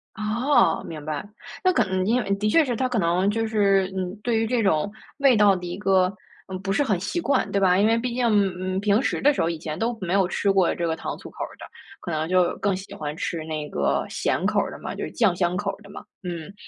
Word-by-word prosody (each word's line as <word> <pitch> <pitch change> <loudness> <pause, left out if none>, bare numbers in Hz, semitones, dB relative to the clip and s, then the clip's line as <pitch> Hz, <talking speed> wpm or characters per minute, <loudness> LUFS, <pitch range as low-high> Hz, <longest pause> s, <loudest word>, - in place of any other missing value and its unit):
哦， 230 +7 +2
明 155 -2 -7
白。 155 +5 -4 0.4
那 370 0 +4
可 - - +3
能， 185 0 -1
嗯， - - -2
因 240 +4 +2
为 200 - -6
的 210 +1 -1
确 325 +7 +5
是 245 -4 -2
他 255 +2 0
可 245 -4 -1
能 175 +3 +2
就 225 +1 0
是， 195 -3 +2
嗯， 185 +1 -3
对 235 -2 +1
于 225 - +1
这 235 0 0
种 195 0 +1 0.3
味 275 -4 +5
道 205 -2 +5
的 180 -1 -6
一 175 0 -4
个， 190 -1 +2 0.3
嗯， 185 -1 -5
不 195 0 -2
是 250 +9 +2
很 200 -9 0
习 270 - -2
惯 280 -5 0
对 200 - +1
吧？ 185 -1 +4
因 210 - +4
为 230 +1 +3
毕 240 0 -2
竟， 245 -1 0
嗯， 185 -2 +1
平 205 +3 +2
时 - - -1
的 290 +1 +5
时 - - -1
候 165 - +1
以 165 - -3
前 155 -1 -5
都 230 0 -1
没 185 0 -2
有 195 -2 +3
吃 200 +1 +1
过 190 -3 +3
这 170 - -2
个 160 -1 0
糖 - - -5
醋 - - -11
口 - - -5
儿 - - -7
的， - - -9 0.3
可 170 - -6
能 155 +1 -2
就 185 -1 +2
更 200 -2 0
喜 190 - -10
欢 150 0 -5
吃 165 -2 -3
那 155 -2 -4
个 - - 0
咸 - - -1
口 - - +2
儿 - - -1
的 - - -8
嘛， - - -5
就 - - -5
是 - - -5
酱 205 -7 +2
香 180 0 0
口 200 -1 -1
儿 215 - -14
的 200 - -15
嘛。 200 - -9 0.2
嗯， 175 -1 -6
195 Hz, 295 characters per minute, -24 LUFS, 180-225 Hz, 0.4 s, 确